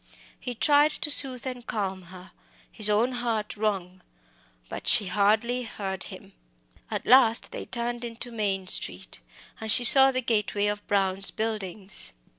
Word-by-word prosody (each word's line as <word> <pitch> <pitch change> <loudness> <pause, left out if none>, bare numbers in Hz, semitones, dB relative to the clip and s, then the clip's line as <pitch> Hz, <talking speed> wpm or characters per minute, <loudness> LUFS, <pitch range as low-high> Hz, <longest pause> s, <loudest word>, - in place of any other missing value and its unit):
He 245 -1 -7
tried 290 +5 +3
to 300 - +1
soothe 260 -3 0
and 250 -2 -8
calm 195 -3 -4
her, 180 +1 -14 0.4
his 215 -2 +3
own 220 +5 +1
heart 235 -4 -4
wrung. 190 -4 -4 0.7
But - - -8
she 230 -4 +5
hardly 215 +6 0
heard 195 -5 -6
him. - - -12 0.6
At - - -5
last 240 -3 +4
they - - -8
turned 240 0 -4
into 240 +1 -8
Maine 200 -4 -3
Street, 90 - 0 0.4
and 220 -1 -3
she 245 - +5
saw 270 +2 +10
the 255 0 -3
gateway 210 -3 -1
of 205 0 -4
Brown's 195 -1 -1
Buildings. 210 - -4
215 Hz, 150 wpm, -25 LUFS, 195-245 Hz, 0.7 s, saw